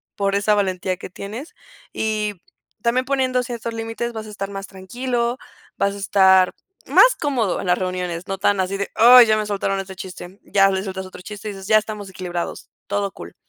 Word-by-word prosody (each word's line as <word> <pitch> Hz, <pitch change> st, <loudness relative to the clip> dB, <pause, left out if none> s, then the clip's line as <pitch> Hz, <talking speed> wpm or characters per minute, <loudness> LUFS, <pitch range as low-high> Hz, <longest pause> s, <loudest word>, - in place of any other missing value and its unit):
por 200 Hz, -1 st, 0 dB
esa 205 Hz, +1 st, +2 dB
valentía 185 Hz, -2 st, -1 dB
que -, -, -8 dB
tienes, 210 Hz, -, -8 dB, 0.4 s
y 215 Hz, -1 st, -1 dB, 0.5 s
también 250 Hz, +2 st, +2 dB
poniendo 260 Hz, -2 st, +1 dB
ciertos 235 Hz, -1 st, -5 dB
límites, 225 Hz, +1 st, -4 dB
vas 220 Hz, -1 st, -6 dB
a -, -, -9 dB
estar 200 Hz, -1 st, -5 dB
más 195 Hz, 0 st, -6 dB
tranquilo, 240 Hz, +5 st, -2 dB, 0.4 s
vas 200 Hz, 0 st, +1 dB
a -, -, -8 dB
estar 190 Hz, -2 st, +4 dB, 0.3 s
más -, -, +6 dB
cómodo 250 Hz, -, 0 dB
en -, -, -6 dB
las 180 Hz, 0 st, +3 dB
reuniones, 180 Hz, -2 st, -3 dB
no 195 Hz, 0 st, -3 dB
tan 200 Hz, 0 st, +2 dB
así 190 Hz, +1 st, -1 dB
de, 200 Hz, -, -3 dB
"¡ay!, 245 Hz, +2 st, +9 dB
ya 215 Hz, -1 st, +3 dB
me 215 Hz, -, -1 dB
soltaron 195 Hz, -1 st, -1 dB
este 190 Hz, 0 st, -7 dB
chiste", 185 Hz, +1 st, -9 dB
ya 195 Hz, -1 st, +4 dB
les 190 Hz, 0 st, -1 dB
sueltas 190 Hz, -1 st, -5 dB
otro 180 Hz, -, -12 dB
chiste 210 Hz, +2 st, -8 dB
y -, -, -5 dB
dices: 195 Hz, -1 st, -9 dB
"Ya 215 Hz, 0 st, +6 dB
estamos 210 Hz, -2 st, -4 dB
equilibrados, 175 Hz, -2 st, -5 dB, 0.2 s
todo 200 Hz, -1 st, -1 dB
cool". -, -, -11 dB
200 Hz, 200 wpm, -21 LUFS, 190-225 Hz, 0.5 s, ay